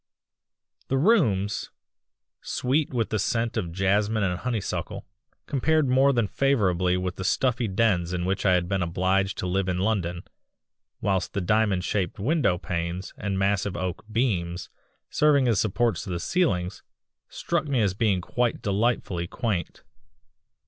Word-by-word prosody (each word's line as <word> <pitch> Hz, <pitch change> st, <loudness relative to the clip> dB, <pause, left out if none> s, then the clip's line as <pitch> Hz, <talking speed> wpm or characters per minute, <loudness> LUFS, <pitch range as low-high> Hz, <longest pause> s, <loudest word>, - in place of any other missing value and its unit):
The 135 Hz, -, 0 dB
rooms, 125 Hz, -, +2 dB, 0.7 s
sweet 140 Hz, +4 st, 0 dB
with 120 Hz, -4 st, -1 dB
the 110 Hz, -, 0 dB
scent 115 Hz, +3 st, 0 dB
of 85 Hz, -, -2 dB
jasmine 100 Hz, +4 st, +1 dB
and 90 Hz, -2 st, -1 dB
honeysuckle, 120 Hz, -5 st, -3 dB, 0.4 s
compared 155 Hz, +2 st, +1 dB
more 135 Hz, +2 st, +4 dB
than 120 Hz, -4 st, +1 dB
favourably 95 Hz, -9 st, +1 dB
with 90 Hz, 0 st, -3 dB
the 95 Hz, -, -4 dB
stuffy 125 Hz, +4 st, +1 dB
dens 95 Hz, -4 st, +1 dB
in 90 Hz, -1 st, -2 dB
which 95 Hz, +1 st, -1 dB
I 95 Hz, -, +4 dB
had 90 Hz, -1 st, +1 dB
been 95 Hz, 0 st, 0 dB
obliged 95 Hz, +3 st, 0 dB
to -, -, -3 dB
live 95 Hz, +1 st, 0 dB
in 90 Hz, -, 0 dB
London; 90 Hz, -3 st, -1 dB, 0.8 s
whilst 95 Hz, -3 st, 0 dB
the 100 Hz, -, -1 dB
diamond 105 Hz, -1 st, +2 dB
shaped 100 Hz, +2 st, -1 dB
window 120 Hz, -, +1 dB
panes 90 Hz, +1 st, -4 dB
and 100 Hz, -2 st, -3 dB
massive 100 Hz, 0 st, 0 dB
oak 95 Hz, -1 st, -3 dB
beams 90 Hz, -8 st, -1 dB, 0.4 s
serving 145 Hz, -3 st, +3 dB
as 110 Hz, -5 st, +2 dB
supports 110 Hz, -3 st, 0 dB
to -, -, -7 dB
the 85 Hz, -1 st, -2 dB
ceilings, 90 Hz, -, 0 dB, 0.5 s
struck 170 Hz, -3 st, -2 dB
me 135 Hz, -3 st, +1 dB
as 100 Hz, -3 st, +2 dB
being 100 Hz, -3 st, +1 dB
quite 120 Hz, +6 st, -1 dB
delightfully 100 Hz, -4 st, 0 dB
quaint. 105 Hz, -5 st, -3 dB
100 Hz, 150 wpm, -26 LUFS, 90-120 Hz, 0.8 s, more